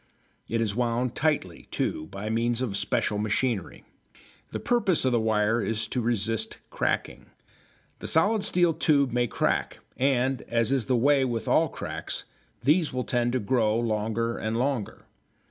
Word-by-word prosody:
It 115 0 0
is 105 -3 -1
wound 120 0 0
tightly, 145 - -1
too, 80 - -2
by 100 +2 -6
means 115 +1 +1
of 120 -6 -2
special 105 +1 0
machinery. 110 -1 -1 0.7
The - - -4
purpose 205 - +1
of 130 - +3
the 120 - +3
wire 110 +1 +1
is 110 -1 -1
to 125 - -1
resist 115 -1 -1
cracking. - - -2 0.7
The - - -6
solid 205 +6 +3
steel 175 -2 +3
tubes 140 -5 +2
may 120 0 +2
crack, - - -1 0.2
and, 130 -1 +1
as 115 0 +1
is 135 -5 +1
the 130 -2 +2
way 140 +3 +4
with 120 -4 -2
all - - +3
cracks, - - -5 0.4
these 155 +4 +3
will 125 0 -2
tend 120 -1 0
to 130 - +1
grow 110 0 +1
longer 115 +1 -1
and 110 +1 -2
longer. 125 -3 -2
120 Hz, 160 wpm, -27 LUFS, 110-130 Hz, 0.7 s, way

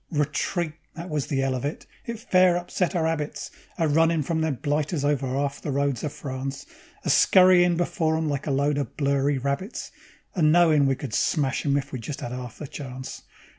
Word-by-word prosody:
Retreat! 150 +2 -1 0.2
That 170 +1 -7
was 150 -3 -1
the 135 -2 0
'ell 135 -1 0
of 125 - -3
it. 145 +2 -4 0.2
It 235 -1 -3
fair 185 -6 +4
upset 180 +1 -2
our 165 -2 +1
'abits, 160 -2 -3 0.3
A 165 - +2
runnin' 160 +1 +3
from 160 +3 -1
them 160 -3 0
blighters 145 +2 -1
over 145 -2 +1
'alf 140 +2 -2
the - - -4
roads 140 -2 0
of 150 - -2
France; 135 0 -5 0.4
A - - -3
scurryin' 180 -2 +6
before 160 -2 0
'em 160 0 -1
like 145 -1 -2
a - - 0
lot 140 +1 +1
of 140 - -5
blurry 140 0 +1
rabbits, 140 - -3 0.4
And 155 -5 +3
knowin' 160 -4 +5
we 135 - +2
could 130 -4 -7
smash 145 +1 0
'em 140 0 +3
if 135 -1 -4
we 130 - -4
just 135 +5 -6
'ad 120 - -4
'alf 125 -2 -7
a - - -4
chance. 130 -2 -7
145 Hz, 205 wpm, -25 LUFS, 135-165 Hz, 0.4 s, scurryin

